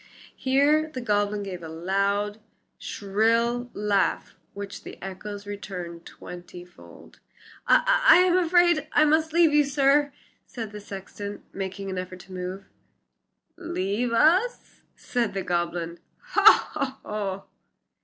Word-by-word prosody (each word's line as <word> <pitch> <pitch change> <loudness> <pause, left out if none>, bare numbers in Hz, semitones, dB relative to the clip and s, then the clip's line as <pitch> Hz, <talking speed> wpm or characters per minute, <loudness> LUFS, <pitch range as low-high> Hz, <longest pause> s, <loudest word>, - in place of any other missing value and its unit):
Here 290 +4 +2
the 265 - -6
goblin 205 -3 0
gave 185 -3 -6
a 165 - -7
loud, 200 +5 -1 0.4
shrill 230 +4 0
laugh 205 -2 0 0.2
which 200 0 -7
the - - -10
echoes 200 +2 -7
returned 180 -4 -7
twenty 175 0 -10
fold. 180 - -17 0.5
"I - - +4
I - - +10
am 360 0 +4
afraid 345 -3 +3
I 300 - +5
must 315 +1 +2
leave 330 -2 +4
you, 295 0 +5
sir," 285 +1 +2 0.4
said 225 -4 -6
the 210 0 -8
sexton, 200 +1 -8
making 195 0 -5
an 185 - -3
effort 185 0 -7
to 185 - -14
move. 185 +2 -6 0.9
"Leave 240 - -2
us!" 345 - +2
said 230 -5 -2
the 195 - -2
goblin; 175 -1 -2 0.3
"ho! 390 - +4
ho! 200 -2 -4
205 Hz, 125 wpm, -25 LUFS, 190-290 Hz, 0.9 s, I